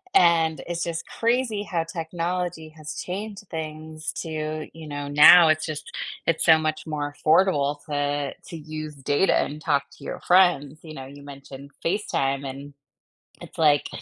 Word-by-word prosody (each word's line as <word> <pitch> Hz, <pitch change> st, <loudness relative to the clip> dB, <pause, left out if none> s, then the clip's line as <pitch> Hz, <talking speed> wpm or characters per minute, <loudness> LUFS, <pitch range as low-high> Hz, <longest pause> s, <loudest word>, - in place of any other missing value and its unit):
and 165 Hz, -2 st, +4 dB
it's 170 Hz, -1 st, -2 dB
just 170 Hz, -1 st, -3 dB
crazy 235 Hz, -2 st, 0 dB
how 175 Hz, -5 st, -2 dB
technology 170 Hz, 0 st, -4 dB
has 155 Hz, -1 st, -9 dB
changed 200 Hz, +2 st, -6 dB
things 155 Hz, 0 st, -5 dB
to, 155 Hz, -1 st, -4 dB
you 160 Hz, -1 st, -10 dB
know, 145 Hz, -1 st, -5 dB
now 155 Hz, +4 st, +8 dB
it's 155 Hz, 0 st, +2 dB
just 155 Hz, -1 st, -6 dB, 0.3 s
it's 165 Hz, -, +1 dB
so 160 Hz, -1 st, +7 dB
much 155 Hz, 0 st, -3 dB
more 145 Hz, -1 st, -3 dB
affordable 150 Hz, -3 st, +2 dB
to 145 Hz, -1 st, -1 dB
to 170 Hz, -, -7 dB
use 155 Hz, -1 st, -7 dB
data 145 Hz, +6 st, +2 dB
and 150 Hz, +2 st, -7 dB
talk 145 Hz, -3 st, +1 dB
to -, -, -16 dB
your -, -, -5 dB
friends. 170 Hz, -5 st, +3 dB
You 155 Hz, -2 st, -10 dB
know, 135 Hz, -, -7 dB
you 140 Hz, +2 st, -12 dB
mentioned 140 Hz, 0 st, -11 dB, 0.2 s
FaceTime, 140 Hz, -8 st, -1 dB
and 140 Hz, +2 st, -9 dB, 0.7 s
it's -, -, -12 dB
like 150 Hz, -3 st, +4 dB
155 Hz, 160 wpm, -24 LUFS, 145-170 Hz, 0.7 s, now